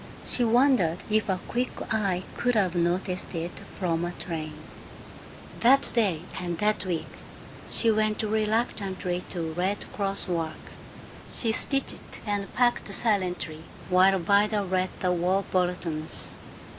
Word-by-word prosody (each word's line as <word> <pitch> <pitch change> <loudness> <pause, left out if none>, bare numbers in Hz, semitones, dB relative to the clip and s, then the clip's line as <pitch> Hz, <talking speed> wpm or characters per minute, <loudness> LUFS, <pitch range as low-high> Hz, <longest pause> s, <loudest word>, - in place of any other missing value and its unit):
She 245 - +2
wondered 235 - +4
if 215 0 +2
a 185 -1 +1
quick 245 +2 0 0.2
eye 195 -4 +1
could 245 0 +1
have 190 -5 +3
noticed 180 +1 0
it 170 +1 -2 0.3
from 170 -3 0
a 175 0 -2
train. 160 -3 -4 1.0
That 270 +4 +5
day 195 -9 +2 0.2
and 175 -2 -3
that 210 +4 +1
week 175 -3 -1 0.6
she 230 - +2
went 215 0 +1
reluctantly 210 -4 0
to 165 -3 -3
Red 185 +4 -1
Cross 200 -1 -1
work; 165 -3 -3 0.6
she 230 - 0
stitched 275 +4 -2
and 205 -2 -2
packed 240 -1 +2
silently, 180 -8 0 0.3
while 190 +1 +6
Vida 205 +4 +3
read 185 0 0
the 180 - +2
war 180 +3 +2
bulletins. 175 -4 -1
190 Hz, 130 wpm, -27 LUFS, 175-215 Hz, 1.0 s, while